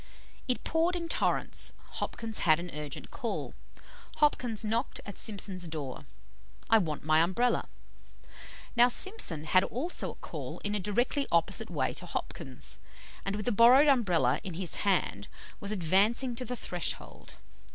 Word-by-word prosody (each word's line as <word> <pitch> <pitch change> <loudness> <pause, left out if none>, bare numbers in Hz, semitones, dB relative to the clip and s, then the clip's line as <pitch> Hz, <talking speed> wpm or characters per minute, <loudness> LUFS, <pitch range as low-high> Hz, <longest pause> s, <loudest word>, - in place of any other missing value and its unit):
"It 250 - 0
poured 330 +3 +1
in 340 -1 -2
torrents, - - -1 0.3
Hopkins 225 -2 -1
had 155 -1 +4
an 175 0 -6
urgent 150 -2 -5
call. - - -3 0.6
Hopkins 245 -7 +1
knocked 230 +5 -1
at 200 - -7
Simpson's 195 -4 -2
door. 150 -5 -6 0.7
'I 225 - +7
want 155 -7 -3
my 155 0 +4
Umbrella.' 210 +9 +1 1.1
Now 240 0 +7
Simpson 250 - +1
had 185 +4 +4
also 305 +10 -2
a - - -16
call - - -7
in 205 - -1
a 210 - 0
directly 240 +8 0
opposite 170 -1 +2
way - - -1
to - - -5
Hopkins; - - -3 0.4
and 195 +1 -2
with 210 - -4
the 245 - +2
borrowed 245 +7 +7
Umbrella 180 - +3
in 180 -4 -5
his 180 0 -1
hand, 180 - 0 0.3
was 200 - -2
advancing 210 +7 +2
to 255 - -4
the 250 - -3
threshold. 180 -6 -4
210 Hz, 150 wpm, -30 LUFS, 175-245 Hz, 1.1 s, I